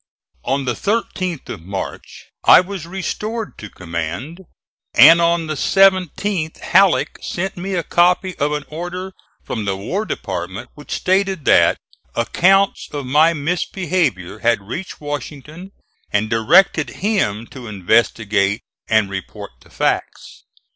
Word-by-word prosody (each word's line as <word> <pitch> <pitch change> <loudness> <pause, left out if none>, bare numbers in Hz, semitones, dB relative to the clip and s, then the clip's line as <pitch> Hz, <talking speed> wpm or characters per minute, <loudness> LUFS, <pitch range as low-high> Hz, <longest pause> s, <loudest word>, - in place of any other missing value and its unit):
On 135 0 -1
the 125 - 0
13th 185 - -2
of - - -6
March 95 +3 -7 0.2
I - - +8
was 180 -2 -5
restored 210 +4 -4
to 110 - -8
command, 85 - -5 0.6
and 165 +1 +8
on 170 0 +2
the 155 - -3
17th 185 0 +2
Halleck 190 0 +2
sent 190 +2 -4
me 190 +2 -4
a 170 - -1
copy 180 +2 +2
of 145 +1 +1
an 150 -1 -3
order 180 +4 -6 0.3
from 110 -3 -4
the 95 -1 -1
War 185 - -3
Department 95 - -5
which 150 - -15
stated 190 -3 0
that - - +5 0.4
accounts 190 - +2
of 145 -2 -5
my 155 +6 +4
misbehavior 155 - -1
had 115 -1 +2
reached 175 - -6
Washington 150 +5 -7 0.4
and 105 +1 0
directed 160 - +4 0.2
him 115 - 0
to 125 -3 -9
investigate 105 0 +1 0.3
and 110 -2 +3
report 95 -2 -7
the - - -20
facts. - - -3
155 Hz, 130 wpm, -19 LUFS, 110-185 Hz, 0.6 s, I